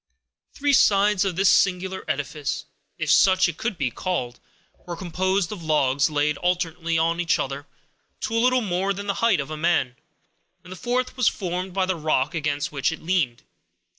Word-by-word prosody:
Three 285 0 +1
sides 205 -4 +4
of 190 -3 -1
this 195 +2 +2
singular 190 0 +1
edifice, 145 +1 -3 0.3
if 160 -1 0
such 185 +3 +5
it 170 -2 -5
could 220 -5 -3
be 135 -5 -1
called, 125 -10 -3 0.5
were 175 - -4
composed 185 +1 -1
of 205 -5 -6
logs 145 -2 +2
laid 150 0 0
alternately 170 -2 -1
on 165 +1 +1
each 175 -1 +2
other, 140 +1 -4 0.5
to - - -3
a 230 - +3
little 255 +1 +3
more 195 -1 -1
than 200 +1 -6
the 200 - 0
height 230 -7 +3
of 140 +2 -4
a 155 - -4
man; 155 -6 +1 0.7
and 180 - -13
the - - -6
fourth 250 +5 -2
was 250 -3 +2
formed 180 0 -2
by 190 -1 +2
the 185 0 -1
rock 155 -2 0
against 145 -2 -2
which 140 -1 0
it 160 - -8
leaned. 160 -9 0
175 Hz, 185 wpm, -24 LUFS, 150-190 Hz, 0.7 s, such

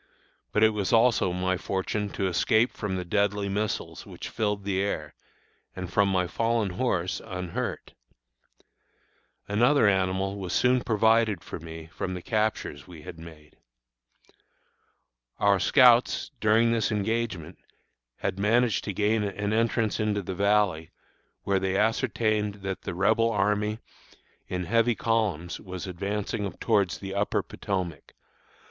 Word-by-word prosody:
But 105 - +2
it 110 - +6
was 105 -3 -2
also 115 -5 +4
my 90 +1 0
fortune 100 +3 -2
to 100 - -1
escape 110 +6 +2
from 100 -3 -3
the 90 -1 -3
deadly 100 +2 0
missiles 105 +2 -3
which - - -8
filled 105 -2 -1
the 95 -1 0
air, 75 -7 -3 0.6
and 90 -2 -6
from 100 -2 +3
my 90 -1 +1
fallen 115 +2 0
horse, 90 -3 -1
unhurt. 90 -4 -5 1.5
Another 120 +4 +4
animal 95 0 +1
was 95 -2 -4
soon 125 0 +3
provided 110 -3 +2
for - - -7
me 80 0 -9
from 95 -1 -3
the 90 - -6
captures 110 - -2
we 85 -4 -12
had 80 - -9
made. 80 -2 -13 1.8
Our 100 -1 +3
scouts, 125 -1 +4
during 110 +2 +4
this 115 -1 +1
engagement, 105 -5 -2 0.6
had 95 - -2
managed 115 +3 +2
to 100 - -3
gain 105 +3 +1
an 105 +1 -2
entrance 115 -1 +1
into 105 -2 0
the 95 - -4
Valley, 100 -4 +1 0.5
where 100 -1 +1
they 95 0 0
ascertained 110 -1 +1
that 95 -1 -4
the - - -5
Rebel 110 +5 +3
army, 105 0 0 0.7
in 90 0 -3
heavy 115 +5 +2
columns, 105 -9 -1
was 95 -2 -7
advancing 100 +2 -3
towards 100 -8 +1
the 95 +2 -7
Upper 100 +1 0
Potomac. 90 -7 -5
100 Hz, 135 wpm, -27 LUFS, 95-110 Hz, 1.8 s, it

